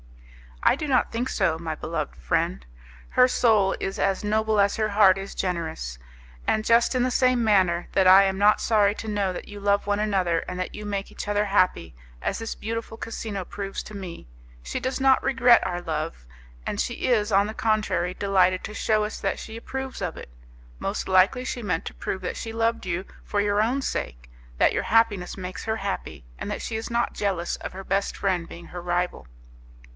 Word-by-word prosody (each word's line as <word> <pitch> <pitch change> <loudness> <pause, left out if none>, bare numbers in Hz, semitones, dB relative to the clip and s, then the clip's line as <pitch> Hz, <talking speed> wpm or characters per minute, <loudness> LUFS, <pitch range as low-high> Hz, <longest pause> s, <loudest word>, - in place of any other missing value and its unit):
"I - - +5
do 305 - -4
not 260 -3 +2
think 240 +3 -2
so, 170 -5 +1
my 160 -1 -4
beloved 155 -2 -4
friend. 65 0 -1 0.4
Her 250 0 +5
soul 215 -6 +3
is 195 - -3
as 195 0 +1
noble 215 0 +1
as 200 0 +3
her 215 -1 +1
heart 200 -2 +5
is 195 0 -7
generous; 160 - -3 0.5
and 215 0 +1
just 235 +3 +4
in 250 - +2
the 255 - +1
same 255 -1 +3
manner 185 -5 +3
that 190 -1 +3
I 190 +2 +9
am 190 -1 0
not 210 +1 +5
sorry 210 -2 +3
to 220 - -7
know 205 -3 0
that - - -7
you 205 0 -9
love 200 0 +1
one 205 0 0
another 190 -5 +1
and 180 - -5
that 185 - -3
you 210 - -7
make 200 -1 -3
each - - -7
other 205 0 +1
happy, 180 - +1 0.3
as - - -2
this 225 0 -4
beautiful 225 +1 -5
casino 215 -4 -5
proves 195 +1 -5
to 215 - -9
me, 180 - -8 0.4
she - - -3
does 260 +1 -2
not 265 -1 +5
regret 245 -2 +5
our 175 -1 -3
love, 155 - -4 0.4
and - - -3
she - - -1
is, 220 -4 +2
on 200 +1 +4
the 215 - -5
contrary, 215 -6 0
delighted 185 -2 +2
to 210 - -6
shew 215 -1 +1
us 210 - -4
that - - -1
she 220 - -8
approves 265 +1 -6
of 180 -3 -2
it. - - -9 0.5
Most - - -3
likely 190 +7 +4
she 250 - -3
meant 200 -5 -1
to - - -5
prove 190 - -4
that - - -4
she 225 - -5
loved 230 -2 0
you 180 +2 -2 0.2
for 205 - -2
your 205 0 +2
own 250 +5 +1
sake, - - -4 0.3
that - - +4
your - - 0
happiness 210 -6 +2
makes 185 -1 -6
her 220 0 -1
happy, 195 - -5
and - - -4
that - - -3
she 225 - -4
is 225 - -4
not 235 0 0
jealous 190 -4 -1
of - - -7
her 190 +1 -7
best 195 +1 -1
friend 180 -4 0
being 170 0 -10
her 175 - -7
rival. 175 - -2
200 Hz, 210 wpm, -25 LUFS, 180-220 Hz, 0.5 s, I